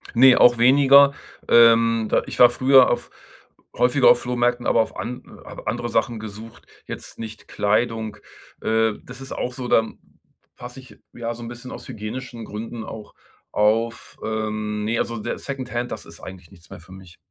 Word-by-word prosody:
Ne, 130 +1 +7
auch 120 -1 +6
weniger. 140 +3 +6 0.4
Ähm, 115 -1 +5
da - - +2
ich - - -7
war 125 - +8
früher 130 +1 +5
auf - - -2 0.7
häufiger 125 +2 +4
auf 120 - +5
Flohmärkten, 120 0 -1
aber 115 - +3
auf 110 - -4
an 125 +1 -8
habe - - -11
andere 120 - -3
Sachen 115 0 -1
gesucht, 110 +1 -11 0.2
jetzt - - -9
nicht 110 -1 -9
Kleidung. 110 +1 -1 0.4
Äh, 110 0 +1
das 125 +1 -12
ist 135 - -10
auch 125 - -4
so, 125 0 -6
dann 115 -2 +1 0.6
passe 125 +2 -10
ich, 130 0 -16 0.2
ja, 120 0 -5
so 120 - -11
'n - - -7
bisschen 120 +1 -10
aus - - -10
hygienischen 115 +2 -7
Gründen 110 +2 -7
auch 110 -1 -10 0.4
auf, 110 +2 0
ähm, 110 -1 -3
ne, 115 +2 -1
also 115 - -2
der 105 - -4
Secondhand, 125 -3 -5
das - - -7
ist - - -14
eigentlich 95 -3 -12
nichts 85 -3 -19
mehr - - -10
für 85 +2 -18
mich. 95 -2 -14
115 Hz, 175 wpm, -22 LUFS, 110-125 Hz, 0.7 s, war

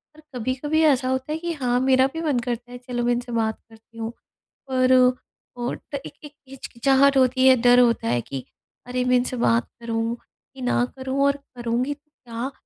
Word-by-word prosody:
और 310 - -16
कभी-कभी 260 +6 -1
ऐसा 265 -4 +3
होता 260 +3 -2
है 310 - -1
कि 340 0 -3
हाँ, 250 -4 0
मेरा 260 0 +4
भी 325 - -4
मन 290 -6 +1
करता 240 0 -4
है 245 - -7
चलो 245 -1 -4
मैं 245 - +2
इनसे 240 0 -4
बात 220 -1 -1
करती 225 +1 -19
हूँ, 225 0 -4 0.6
पर 255 0 +3 0.6
ओट 245 +4 -5
एक 275 - -6
एक 295 - -10 0.2
हिचकिचाहट 270 +1 +2
होती 260 0 +4
है 260 - +8
डर 245 0 +6
होता 235 - +3
है 120 +1 +1
कि 135 +1 -7 0.4
अरे, 250 0 -2
मैं 250 0 +3
इनसे 250 0 -1
बात 230 0 +2
करूँ 230 0 -2 0.4
कि 265 - -11
ना 245 -1 +1
करूँ 265 +1 -1
और 280 0 +2 0.2
करूँगी 240 +3 -1
तो 295 +1 -24 0.2
क्या? 235 +3 -4
250 Hz, 195 wpm, -23 LUFS, 240-270 Hz, 0.6 s, है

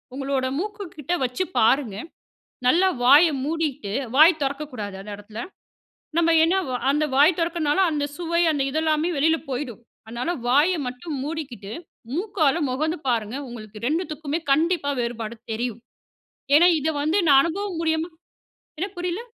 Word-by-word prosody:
உங்களோட 270 -1 -1
மூக்கு 415 +2 -4
கிட்ட 305 +4 -3
வச்சு 250 +8 -2 0.2
பாருங்க. 225 -2 +3 0.7
நல்லா 355 +9 +5 0.2
வாய 285 +7 +8 0.2
மூடிக்கிட்டு, 295 -9 -2 0.2
வாய் 315 +1 +7
திறக்கக்கூடாது 270 -8 -4
அந்த 205 +2 -9
இடத்துல. 210 +2 -9 0.8
நம்ம 335 0 +4
என்ன 330 +3 +3 0.4
அந்த 300 +2 +1
வாய் 305 +5 +5
திறக்கிறனால 330 -1 0
அந்த 295 -2 -1
சுவை 340 0 0
அந்த 290 - -1
இதெல்லாமே 315 +2 +1
வெளில 320 +3 +3
போயிடும். 250 -3 -4 0.3
அதனால 240 +9 -3 0.2
வாய 295 +9 +4
மட்டும் 270 +5 -6
மூடிக்கிட்டு 275 -10 -6 0.4
மூக்கால 335 -4 +1
முகந்து 310 +7 -1
பாருங்க 230 -2 0
உங்களுக்கு, 220 -3 -10
2த்துக்குமே 310 0 -2
கண்டிப்பா 320 0 +2
வேறுபாடு 235 -1 -3 0.2
தெரியும். 235 0 -3 0.8
ஏனா, 335 +4 +7
இத 300 - -1
வந்து 315 +6 +1
நான் 275 -1 +8
அனுபவம் 370 +3 -3
மூலியமா 320 0 0 0.7
என்ன 375 +6 -2
புரியல? 355 +3 -2
295 Hz, 135 wpm, -23 LUFS, 250-330 Hz, 0.8 s, வாய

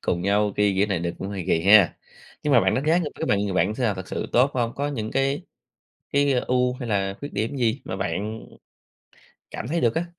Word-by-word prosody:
cùng 85 -1 -1
nhau 100 +2 +1
ki 105 -1 +2
kiểu 100 +2 +2
này 100 -4 -1
được, 85 +1 -2
cũng 95 - -5
hơi 100 -3 -5
kỳ 80 -3 +1
ha. 100 -2 +6 0.5
Nhưng 150 - +1
mà 120 - +7
bạn - - +2
đánh 135 - -1
giá 165 +3 +4
người 160 -5 -2
cái - - -4
bạn 100 - +2
người 100 - -2
bạn 95 +3 +1
sao, 115 -5 0
thực 95 -1 -8
sự - - -3
tốt 125 +4 +4
hông? 120 -2 0
Có 145 +1 -2
những 110 -7 -4
cái 135 +1 0 0.7
cái 140 0 +3
ưu 125 0 +1
hay 125 -2 -6
là 95 -2 0
khuyết 145 - -7
điểm 110 +7 -2
gì 120 +1 0
mà 95 - -4
bạn 105 +3 -4 1.1
cảm - - -5
thấy 165 +5 -1
được 115 -2 +2
á? 170 +1 0
110 Hz, 240 wpm, -24 LUFS, 100-135 Hz, 1.1 s, mà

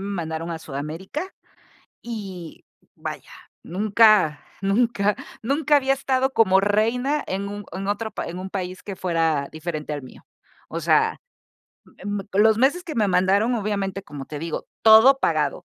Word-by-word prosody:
mandaron 165 -2 -4
a 165 - -4
Sudamérica, 160 - -6 0.7
y 195 -8 -8 0.3
vaya, - - -7 0.3
nunca, 205 -5 +3 0.2
nunca, 205 0 +1 0.3
nunca, 295 +4 +2
había 270 -1 +2
estado 265 0 0
como 190 -6 +4
reina, 230 +8 +1
en 195 +1 -3
un 205 0 -7
en 195 +2 -4
otro 220 +2 -2
pa - - -4
en 175 +2 -6
un 190 +1 -6
país 185 -1 -5
que 200 -2 -6
fuera 165 -6 0
diferente 155 -1 -5
al 145 -2 -4
mío. 130 - -14 0.4
O - - -4
sea - - +2 0.9
mm, 205 0 -2 0.2
los 220 0 +5
meses 285 +9 +2
que 310 - -6
me 210 -3 +2
mandaron, 195 +6 +3
obviamente, 200 -2 -2
como 145 -4 -8
te 150 -1 -7
digo, 165 0 -5 0.2
todo 225 +5 +8
pagado, - - 0
200 Hz, 150 wpm, -23 LUFS, 170-230 Hz, 0.9 s, todo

